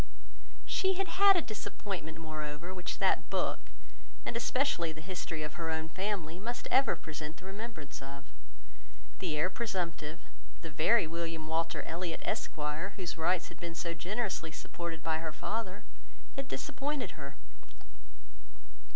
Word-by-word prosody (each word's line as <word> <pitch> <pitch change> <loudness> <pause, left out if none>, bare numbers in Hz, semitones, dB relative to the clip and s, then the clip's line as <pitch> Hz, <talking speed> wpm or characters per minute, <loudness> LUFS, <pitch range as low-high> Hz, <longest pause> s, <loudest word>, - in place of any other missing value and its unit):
She 380 0 +3
had 390 0 +1
had 390 +3 +8
a 350 - +4
disappointment, 195 -6 -3
moreover, 155 +2 -3
which 180 -1 -2
that - - +4
book, - - +2 0.7
and - - -1
especially 230 - +3
the 155 - -7
history 165 -2 -2
of 150 - -3
her 165 - 0
own 160 0 0
family, 185 -2 -1
must 240 +4 -2
ever 270 +2 +6
present 155 0 -5
the 185 - -11
remembrance 195 -7 -5
of. 140 +1 -7 0.9
The 165 -5 0
heir 180 +5 +3
presumptive, 170 -7 -1 0.4
the 165 - -4
very 170 +8 +6
William 165 -1 -2
Walter 165 +1 +1
Elliot, 170 0 -2
Esq., - - 0 0.4
whose 180 -3 -2
rights 175 +2 +2
had - - -11
been 170 -1 -4
so 170 0 -1
generously 185 -1 -1
supported 165 0 -4
by 160 -1 +2
her 160 -1 -2
father, 205 +3 -2 0.5
had 275 -1 -2
disappointed 285 +1 -1
her. 140 -3 -7
170 Hz, 140 wpm, -34 LUFS, 160-210 Hz, 0.9 s, had